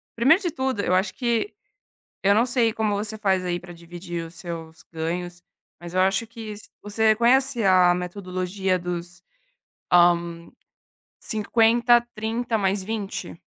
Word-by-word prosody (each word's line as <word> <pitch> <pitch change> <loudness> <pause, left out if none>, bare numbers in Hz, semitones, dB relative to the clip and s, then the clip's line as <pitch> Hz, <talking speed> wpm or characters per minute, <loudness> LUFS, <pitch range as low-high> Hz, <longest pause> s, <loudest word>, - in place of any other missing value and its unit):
primeiro 270 - +4
de 345 - -1
tudo, 260 -6 -2
eu 180 - 0
acho 185 +3 +1
que 240 - -1 0.7
eu 200 +1 +4
não 225 +3 +4
sei 240 -3 +2
como 215 -1 -1
você 210 +2 -3
faz 190 -3 +1
aí 175 -1 -1
pra 175 0 -11
dividir 170 0 -7
os 165 - -14
seus 165 -2 -8
ganhos, 175 +2 -4 0.4
mas 175 0 -9
eu 185 - +2
acho 190 +4 +2
que 220 -2 -8
se 210 - -14
você 215 +1 +2
conhece 245 +1 +2
a 185 -2 +5
metodologia 185 +1 -2
dos, 175 0 -6 0.7
hã, 175 -1 +4 0.9
50, 235 +2 +3
30 225 +2 -2
mais 195 -1 0
20? 205 -3 -5
195 Hz, 145 wpm, -24 LUFS, 175-225 Hz, 0.9 s, a